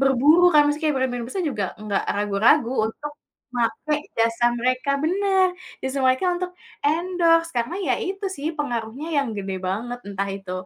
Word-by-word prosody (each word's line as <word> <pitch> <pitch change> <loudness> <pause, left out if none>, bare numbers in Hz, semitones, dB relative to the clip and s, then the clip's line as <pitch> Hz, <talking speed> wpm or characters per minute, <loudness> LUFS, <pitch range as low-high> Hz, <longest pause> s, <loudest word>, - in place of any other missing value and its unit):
berburu 290 +7 +5
kan 300 - +7
maksudnya 295 +2 -2
kayak - - -3
brand-brand 245 -2 -1
besar 380 - -2
juga 210 -7 -2 0.2
nggak 210 -2 -1
ragu-ragu 210 +6 +3 0.2
untuk 295 0 -7 0.8
make 300 0 -1
jasa 230 +1 +2
mereka 255 +3 0
benar, 380 +1 +3 0.3
justru 265 +1 -2
mereka 260 +8 +2
untuk 360 0 -4 0.3
endorse 330 +1 +2
karena 235 +8 -1
ya 250 - +3
itu 390 +1 -3
sih 290 +3 -3
pengaruhnya 245 +1 -3
yang 275 -3 +1
gede 195 -1 -4
banget, 240 +6 -3
entah 200 0 -2
itu 195 -2 -8
270 Hz, 160 wpm, -23 LUFS, 230-330 Hz, 0.8 s, kan